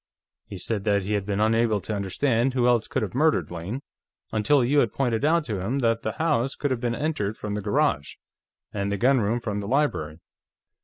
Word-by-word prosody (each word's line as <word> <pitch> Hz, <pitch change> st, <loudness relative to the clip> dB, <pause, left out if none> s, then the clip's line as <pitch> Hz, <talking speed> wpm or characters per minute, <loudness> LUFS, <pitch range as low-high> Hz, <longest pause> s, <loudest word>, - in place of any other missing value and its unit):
He 100 Hz, -, -7 dB
said 100 Hz, +3 st, -2 dB
that 100 Hz, -2 st, +2 dB
he 105 Hz, +3 st, -2 dB
had 100 Hz, -1 st, -1 dB
been 100 Hz, -1 st, -1 dB
unable 110 Hz, 0 st, +2 dB
to 110 Hz, -, -4 dB
understand 115 Hz, +6 st, 0 dB
who 125 Hz, -2 st, +2 dB
else 120 Hz, -2 st, +3 dB
could -, -, -1 dB
have 105 Hz, -, -4 dB
murdered 155 Hz, -, +2 dB
Lane, 90 Hz, +10 st, -5 dB, 0.5 s
until 120 Hz, +5 st, +3 dB
you 145 Hz, +4 st, +3 dB
had 115 Hz, -6 st, +2 dB
pointed 120 Hz, -3 st, -1 dB
out 165 Hz, +2 st, +3 dB
to 110 Hz, -9 st, -3 dB
him 105 Hz, +9 st, -2 dB
that 115 Hz, -3 st, +1 dB
the 110 Hz, -, -3 dB
house 145 Hz, -5 st, 0 dB
could 145 Hz, -, -2 dB
have 130 Hz, -, 0 dB
been 120 Hz, -1 st, -1 dB
entered 110 Hz, -9 st, -2 dB
from 105 Hz, -1 st, -5 dB
the 105 Hz, -, -2 dB
garage, 110 Hz, -, 0 dB, 0.6 s
and 100 Hz, -1 st, -2 dB
the 100 Hz, -, -1 dB
gunroom 120 Hz, -1 st, +2 dB
from 105 Hz, -3 st, -3 dB
the 100 Hz, -, -5 dB
library. 115 Hz, -, 0 dB
115 Hz, 210 wpm, -25 LUFS, 100-135 Hz, 0.6 s, else